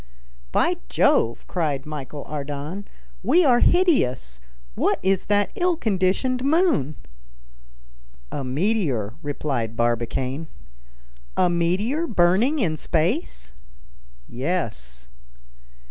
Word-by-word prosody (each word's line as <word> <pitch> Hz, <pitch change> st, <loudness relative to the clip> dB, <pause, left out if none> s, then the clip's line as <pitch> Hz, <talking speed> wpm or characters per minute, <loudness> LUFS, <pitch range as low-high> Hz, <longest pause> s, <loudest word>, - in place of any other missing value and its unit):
"By -, -, +2 dB
Jove!" 115 Hz, -, +2 dB
cried 150 Hz, -6 st, -2 dB
Michel 150 Hz, -2 st, -6 dB
Ardan, 150 Hz, +6 st, -5 dB, 0.4 s
"we 310 Hz, -, +4 dB
are 245 Hz, -3 st, +5 dB
hideous. 130 Hz, -, +2 dB, 0.3 s
What -, -, +1 dB
is 190 Hz, 0 st, +1 dB
that 205 Hz, -1 st, +2 dB
ill 355 Hz, -1 st, +1 dB
conditioned 220 Hz, -, 0 dB
moon?" 285 Hz, -, +2 dB, 1.4 s
"A 140 Hz, -, -3 dB
meteor," 135 Hz, -, 0 dB
replied 135 Hz, -6 st, -3 dB
Barbicane. 120 Hz, +5 st, -1 dB, 0.9 s
"A 180 Hz, -, +3 dB
meteor 195 Hz, -, 0 dB
burning 200 Hz, -, +3 dB
in 170 Hz, -, 0 dB
space?" 160 Hz, -, -1 dB, 0.7 s
"Yes." 105 Hz, -, -3 dB
165 Hz, 90 wpm, -23 LUFS, 130-220 Hz, 1.4 s, are